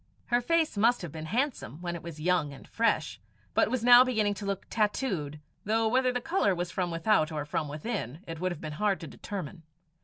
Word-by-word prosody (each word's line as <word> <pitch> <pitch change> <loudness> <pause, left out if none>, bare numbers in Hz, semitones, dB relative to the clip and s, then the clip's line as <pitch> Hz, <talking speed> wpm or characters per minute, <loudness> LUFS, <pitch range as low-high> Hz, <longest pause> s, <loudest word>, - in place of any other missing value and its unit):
Her 240 - +5
face 325 -2 +1
must 230 +1 +3
have 170 - -5
been 160 0 -7
handsome 230 - -2
when 175 -1 -4
it 170 - -6
was 165 -2 -8
young 165 -2 +1
and 135 - -13
fresh; 230 0 0 0.3
but - - +3
was 255 -3 -1
now 245 +1 +9
beginning 220 -5 +1
to 200 0 -6
look 200 -1 -3
tattooed, 195 - -1 0.2
though 220 +2 +1
whether 255 +2 +3
the 250 - -1
colour 255 - +1
was 175 0 -3
from 180 0 -1
without 165 -1 +2
or 150 -2 -3
from 150 +1 -2
within, 150 - -4
it 165 -1 -7
would 185 +1 0
have 165 - -6
been 155 - -5
hard 205 -2 +2
to 165 - -6
determine. 180 -1 -7
195 Hz, 215 wpm, -29 LUFS, 160-230 Hz, 0.3 s, now